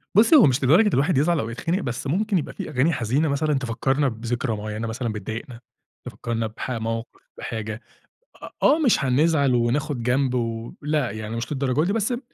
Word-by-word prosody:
بُصّي، 230 +10 +6
هو 275 - +8
مش 135 0 +1
لدرجة 175 - +5
الواحد 145 +2 +2
يزعل 160 +2 +2
أو 115 - -3
يتخنق، 165 - -2
بس 125 - -4
ممكن 200 +5 +1
يبقى 150 - -3
في - - -6
أغاني 140 +6 +2
حزينة 130 +6 0
مثلًا 150 +2 0
تفكّرنا 135 +2 0
بذكرى 115 0 -2
معيّنة 110 +2 -4
مثلًا 115 0 -3
بتضايقنا، 115 +4 -6 0.5
تفكّرنا 115 -1 -3
بحا 115 +2 -5
موقف 115 +1 -4 0.2
بحاجة. 110 0 -5 0.6
أ - - -7
آه، 300 +4 +5
مش 240 - +3
هنزعل 140 0 +3
وناخُد 120 +2 0
جنب 125 +1 +1
و 115 -1 -3
لأ، 150 -4 0
يعني 110 +1 -6
مش 115 +5 -4
للدرجة 135 +1 0
دي، 200 - 0
بس 225 +2 0
ب 240 - -2
130 Hz, 185 wpm, -23 LUFS, 115-155 Hz, 0.6 s, هو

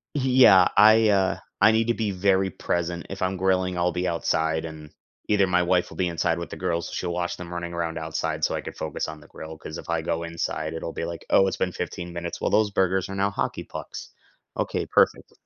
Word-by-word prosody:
Yeah, 125 -9 +6
I, 110 +1 +7
uh 95 -2 +2 0.2
I 110 +2 +7
need 115 +1 +1
to 120 - +3
be 110 -3 -2
very 95 0 +2
present. 85 0 -3
If 95 0 -7
I'm 95 0 0
grilling, 95 -1 +1
I'll 90 0 +1
be 90 0 -1
outside, 80 -1 0
and 75 -1 -9 0.4
either 100 -2 +3
my 90 -1 +2
wife 90 0 +1
will - - -12
be 90 - +1
inside 85 0 0
with 85 - -6
the - - -7
girls, 85 -2 -2
she'll 90 -1 -3
watch 90 0 -2
them 90 -1 -8
running 85 0 -5
around 85 -1 -3
outside 80 0 -3
so - - +2
I - - -3
could - - -8
focus - - -4
on 80 -1 -8
the - - -16
grill 80 0 -9
'cause 80 0 -8
if - - -11
I 85 -1 0
go 85 0 -2
inside, 85 -1 -3
it'll 80 0 -5
be - - -3
like, 85 -1 -7
"Oh, 95 - +5
it's 95 - -2
been 90 - 0
15 90 -1 -5
minutes. 85 0 -5
Well, - - -1
those 110 -1 +3
burgers 95 0 +1
are 95 - -5
now 100 +1 +1
hockey - - -3
pucks. - - -8 0.5
Okay, - - -2
perfect." - - +2
90 Hz, 235 wpm, -25 LUFS, 85-95 Hz, 0.5 s, I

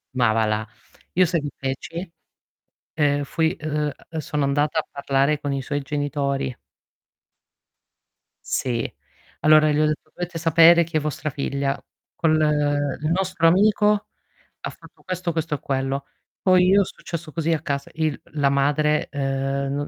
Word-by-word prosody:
Ma 120 -3 +3
va 110 0 +2
là. 110 +1 -1 0.5
Io 185 +1 +5
sai 170 -2 0
che 145 - -4
feci? 165 +7 -5 0.8
Ehm, 145 -2 +1
fui 160 +4 0
ehm, 150 -1 -2 0.2
ehm 160 - -4
sono 150 -2 -2
andata 145 +3 +1
a - - -3
parlare 140 +1 +1
con 145 -1 -2
i 135 - -2
suoi 145 +2 -3
genitori. 140 -2 -2 1.9
Sì. 120 -3 -1 0.5
Allora 155 0 +6
gli 150 - +1
ho 155 - +4
detto: 155 0 -2
"Dovete 175 -1 -5
sapere 165 +1 +6
che 160 -1 -1
vostra 155 +1 -3
figlia 140 0 -2 0.3
col 160 -2 +2 0.7
il 155 - -1
nostro 185 -2 +2
amico 210 +3 +3 0.5
ha - - -4
fatto - - -16
questo, 180 -2 -2
questo 160 -1 -2
e - - -7
quello". 135 0 -2 0.4
Poi 185 -1 +5
io 200 +2 +6
è - - +1
successo 170 -3 -7
così 165 +1 -1
a 155 - -1
casa, 140 -1 -3
il 155 -2 -1
la 145 -2 +2
madre, 150 +2 +2
ehm, 135 0 -1
non 145 0 -2
150 Hz, 155 wpm, -23 LUFS, 140-165 Hz, 1.9 s, Allora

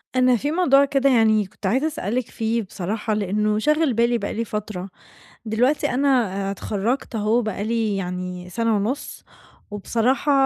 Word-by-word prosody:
أنا 255 -1 +4
في 285 +6 -1
موضوع 280 -5 +4
كده 275 0 +2
يعني 220 -4 +4
كنت 195 - -12
عايزة 260 +10 +2
أسألِك 245 - -3
فيه 225 +1 -1
بصراحة 210 +4 -3
لأنّه 210 +1 0
شاغل 300 +1 +2
بالي 235 +1 +2
بقى - - -4
لي 230 +1 -2
فترة، 210 -3 -5 0.6
دلوقتي 250 +7 +1
أنا 270 +3 +1 0.4
آآ - - -1
اتخرجت 215 +6 -2
أهو 220 +3 +2
بقى 215 -3 -3
لي 220 -2 0
يعني 180 -1 -5
سنة 225 +4 0
ونص 230 +8 -3 0.5
وبصراحة 235 +7 0
225 Hz, 155 wpm, -22 LUFS, 205-255 Hz, 0.6 s, أنا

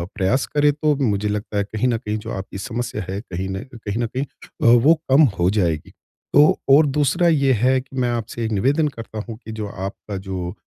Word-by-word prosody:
प्रयास 110 +7 +1
करें 145 0 +4
तो 150 0 +1
मुझे 105 -7 0
लगता 105 0 -3
है 100 - +2
कहीं 110 +4 -2
न 120 -2 +1
कहीं 105 -1 -3
जो 110 +2 -7
आपकी 95 0 -6
समस्या 120 +2 -4
है, 95 +1 -3
कहीं 95 -3 -5
न 95 +3 -4
कहीं 110 -3 -5
न - - +1
कहीं 130 +4 -3
अ, 140 - -9 0.2
वो 160 - +8 0.2
कम 135 +4 +7 0.2
हो 90 +1 +3
जाएगी। 85 -7 0 0.4
तो 150 +2 +6
और 145 +3 +7
दूसरा 145 +4 +2
ये 140 -5 +3
है 130 +3 +2
कि 135 +1 -15
मैं 125 -1 +1
आपसे 115 0 -3
निवेदन 135 +9 +2
करता 115 -5 -7
हूँ 115 -2 -7
कि 110 - -7
जो 110 -1 -4
आपका 100 +1 -6
जो 95 -2 -5
115 Hz, 215 wpm, -21 LUFS, 100-135 Hz, 0.4 s, वो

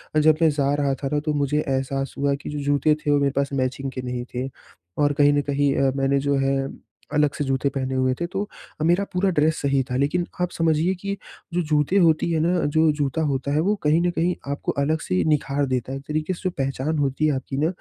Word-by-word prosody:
अ, - - +5
जब 155 0 +5
मैं 165 - +6
जा 145 -1 +1
रहा 140 -1 +1
था - - +1
ना 150 - +2
तो 155 - +1
मुझे 145 0 +1
एहसास 135 0 -1
हुआ 140 0 +1
कि 140 - -8
जो 150 - -4
जूते 145 +2 +3
थे 145 - +2
वो 145 - +4
मेरे 140 -1 +2
पास 140 0 0
मैचिंग 135 0 -2
के 130 - -5
नहीं 125 -1 -4
थे। 130 +2 -2 0.5
और 145 0 +2
कहीं 145 0 +4
न 145 - +2
कहीं 140 -1 +1
अ, 135 -1 +2
मैंने 135 0 +2
जो 140 +1 +1
है 135 0 +1 0.5
अलग 150 -1 +2
से 150 - 0
जूते 135 0 0
पहने 130 -1 -3
हुए 130 0 +2
थे। 170 - -1
तो 195 - -3 0.4
अ, - - +1
मेरा 175 +4 +3
पूरा 185 +2 +2
ड्रेस 155 -2 +2
सही 140 -1 +2
था 125 - -2
लेकिन 150 +6 +1 0.2
आप 180 0 0
समझिए 165 +2 +1
कि 200 0 -3 0.4
जो 175 - +1
जूते 150 +5 +2
होती 170 -2 +3
है 160 - +1
ना 175 +2 +1
जो 155 +2 +3
जूता 145 +2 0
होता 140 -2 -1
है 150 - +2
वो 200 +5 +2
कहीं 150 +2 +4
न 175 - +2
कहीं 175 +1 0 0.2
आपको 140 - -2
अलग 155 +3 +1
से 90 - -2
ही 90 - +2
निख़ार 145 -2 +1
देता 130 -1 -2
है, 135 - -3
एक 135 - -10
तरीके 155 +3 -1
से 175 - -10
जो 185 - +1
पहचान 135 +3 -1
होती 140 +1 0
है 150 - +1
आपकी 135 +1 -4
ना, 150 +3 +2
145 Hz, 255 wpm, -23 LUFS, 135-155 Hz, 0.5 s, मैं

